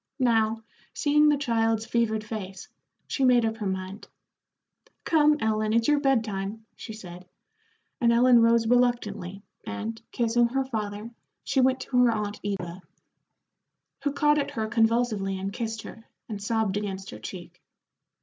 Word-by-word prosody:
Now, 225 -4 +1 0.3
seeing 300 0 +4
the 295 - +3
child's 225 -5 0
fevered 220 -2 0
face, 195 -3 -7 0.4
she 275 - -2
made 245 -2 +5
up 225 0 -2
her 210 -3 -3
mind. 190 +2 -5 1.0
"Come, 300 -2 +4
Ellen, 215 -1 0
it's 230 0 +2
your 295 -1 +4
bed 270 -5 +2
time," 205 +1 -5
she 225 - -9
said, 180 -4 -10 0.7
and 235 -2 +3
Ellen 240 0 +6
rose 230 0 +4
reluctantly, 215 -6 0 0.2
and, 225 +1 -5
kissing 235 0 +2
her 270 +2 -1
father, 215 -2 -4 0.3
she 265 - +1
went 260 0 +2
to 250 - -2
her 240 - +4
aunt 210 -2 -3
Eva, 185 -3 -4 1.2
who 285 - +1
caught 295 +1 +3
at 280 - -1
her 220 -1 -3
convulsively 225 -3 +1
and 195 +1 -4
kissed 225 -2 -4
her, 225 - -11 0.2
and 210 -3 -6
sobbed 210 -1 0
against 195 -2 -5
her - - -9
cheek. 180 -1 -9
225 Hz, 150 wpm, -26 LUFS, 205-245 Hz, 1.2 s, Ellen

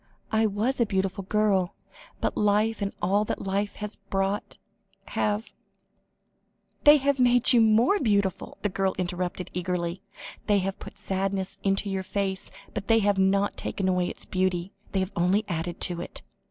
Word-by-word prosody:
I 220 0 +3
was 220 +6 0
a - - +5
beautiful 195 0 -1
girl. 200 -3 +1 0.5
But - - 0
life, 210 +2 +2
and 200 0 -1
all 200 +2 +3
that - - -3
life 200 +1 -1
has 210 -1 -6
brought 195 +2 -2 0.5
have 210 +2 -1 0.6
" - - -45
"They 295 +1 +9
have 280 -1 +1
made 245 -1 +5
you 240 - +6
more 225 - +4
beautiful," 200 - 0
the 205 - +2
girl 190 0 0
interrupted 180 0 -3
eagerly; 180 0 -2 0.5
"they 205 -1 +4
have 195 0 -2
put - - -10
sadness 195 -1 -2
into 195 +1 +1
your 195 -1 -1
face, 190 0 -2 0.2
but 200 - -4
they 225 - +5
have 205 -1 +2
not 195 +1 +2
taken 190 - -2
away 180 -1 +2
its - - -7
beauty; 185 -1 -1 0.2
they 190 - +1
have 190 +2 -3
only 185 +5 +2
added 170 -1 -3
to 175 -2 0
it." - - -8
195 Hz, 165 wpm, -27 LUFS, 185-210 Hz, 0.6 s, They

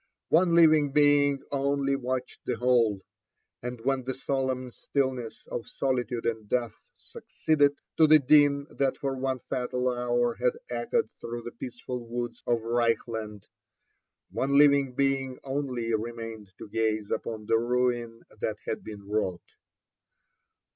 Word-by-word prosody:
One 170 +1 +4
living 155 -4 +6
being 145 -1 +4
only 140 0 +1
watched 130 -1 -3
the 125 - 0
whole; 115 -4 +2 0.6
and 125 0 -5
when 135 +1 0
the 130 +1 -3
solemn 130 -2 -2
stillness 130 -3 -3
of 115 - -4
solitude 125 -3 -2
and 110 -2 -2
death 120 -3 0 0.2
succeeded 145 -2 0 0.2
to 160 - +6
the 155 0 +8
din 140 0 +4
that 135 -1 0
for 135 -1 -2
one 130 0 -1
fatal 125 0 -2
hour 120 0 +1
had - - +3 0.2
echoed 470 -2 0
through 120 0 -6
the 120 - -6
peaceful 125 +1 -6
woods 120 0 -5
of 120 -2 +1
Reichland, 115 -3 -1 0.9
one 140 +1 +1
living 140 -3 +5
being 135 -1 0
only 130 -4 -2
remained 115 -2 -4
to - - -9
gaze 110 -1 -1
upon 110 -2 -3
the 115 +1 +3
ruin 120 -1 -1 0.2
that 110 - -2
had - - -3
been 100 -2 -9
wrought. 100 -4 -2
125 Hz, 135 wpm, -28 LUFS, 115-140 Hz, 0.9 s, the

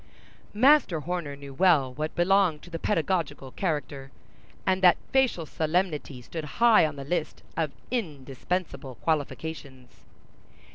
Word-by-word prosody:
Master 255 - +4
Horner 170 -3 -4
knew 140 -1 -10
well 145 -5 +3
what 155 +3 -4
belonged 180 -3 +2
to 175 - -13
the 165 - -4
pedagogical 165 -8 -1
character, 145 -6 -3 0.5
and 190 0 +1
that 180 -2 +6
facial 260 -11 +2
solemnity 155 -5 -2
stood 160 +5 -6
high 230 -8 +6
on 150 - -7
the 140 - -7
list 160 +2 -3
of 155 -3 -1 0.2
indispensable 145 - -4
qualifications. 145 -4 -4
160 Hz, 125 wpm, -27 LUFS, 140-185 Hz, 0.5 s, that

